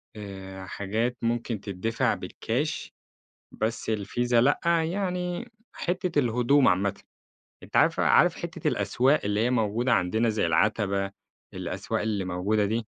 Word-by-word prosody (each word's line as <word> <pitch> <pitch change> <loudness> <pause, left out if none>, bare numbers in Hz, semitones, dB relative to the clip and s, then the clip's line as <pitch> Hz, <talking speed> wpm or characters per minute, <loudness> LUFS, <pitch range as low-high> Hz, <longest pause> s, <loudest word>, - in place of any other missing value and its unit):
آآ، 95 -2 -8
حاجات 110 +6 -2
ممكن 115 -1 -1
تدّفع 105 +4 -1
بالكاش 145 +7 -3 0.6
بس 110 +1 -2
الVISA، 110 +4 -1
لأ، 125 +5 +4 0.2
يعني 180 +5 -2 0.2
حتة 180 -2 -2
الهدوم 125 +2 +3
عامةً، 95 +2 +2 0.7
أنت - - -6
عارف - - +4
عارف - - +5
حتة - - -3
الأسواق 135 +5 +2
اللي 105 +1 0
هي 120 +2 +2
موجودة 120 +1 +1
عندنا 110 +4 +2
زي 110 -5 +1
العتبة، 100 +3 +1 0.4
الأسواق - - -3
اللي 105 -3 -1
موجودة 95 +4 0
دي، 110 +2 -1
110 Hz, 125 wpm, -27 LUFS, 100-125 Hz, 0.7 s, عارف